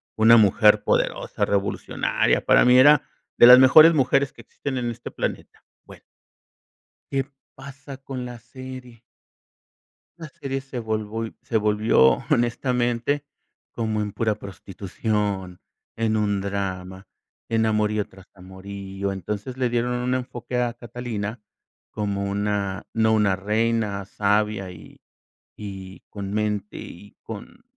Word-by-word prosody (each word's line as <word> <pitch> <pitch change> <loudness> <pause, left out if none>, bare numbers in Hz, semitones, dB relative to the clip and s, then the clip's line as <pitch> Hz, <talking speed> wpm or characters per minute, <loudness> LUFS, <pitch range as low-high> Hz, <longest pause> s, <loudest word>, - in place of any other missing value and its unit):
una 115 +1 +6
mujer 105 0 +5
poderosa, - - -1
revolucionaria, 100 0 0
para - - +5
mí 125 0 +6
era 145 +2 +7 0.4
de - - +8
las 125 +1 +10
mejores 155 +5 +8
mujeres 135 -1 +2
que - - -22
existen 130 +3 -6
en 120 -1 -2
este 120 0 -7
planeta, - - -5 0.2
bueno - - -14 1.1
¿qué 135 -1 0 0.3
pasa 140 0 -10
con 130 -2 -6
la 120 -1 -8
serie? 125 0 -11 1.2
La 160 -2 -8
serie 135 0 -5
se 135 -2 -8
volvió 110 0 -4
se 125 -3 -2
volvió, 105 - +3
honestamente, 120 +3 0 0.5
como 110 -2 -2
en 105 -1 -4
pura 110 -2 0
prostitución, 100 -1 -4 0.4
en 110 -1 0
un 100 -2 0
drama, 95 -1 -4 0.4
en 110 -1 +1
amorío 105 -1 0
tras 95 -1 -17
amorío, 95 +1 -6
entonces, 105 +6 -5
le 125 -2 0
dieron 120 +1 0
un 125 +1 -1
enfoque 125 -1 -4
a 120 -1 -1
Catalina 115 -2 -6 0.5
como 100 -2 -3
una, 100 -1 -2
no 110 -1 +2
una 100 -3 +2
reina 105 -1 -1
sabia 105 -1 0
y 80 -3 -14 0.6
y 95 -2 -9
con 100 -1 -6
mente 105 -1 -2
y 100 +4 -11
con, 115 - -10
110 Hz, 125 wpm, -23 LUFS, 100-125 Hz, 1.2 s, las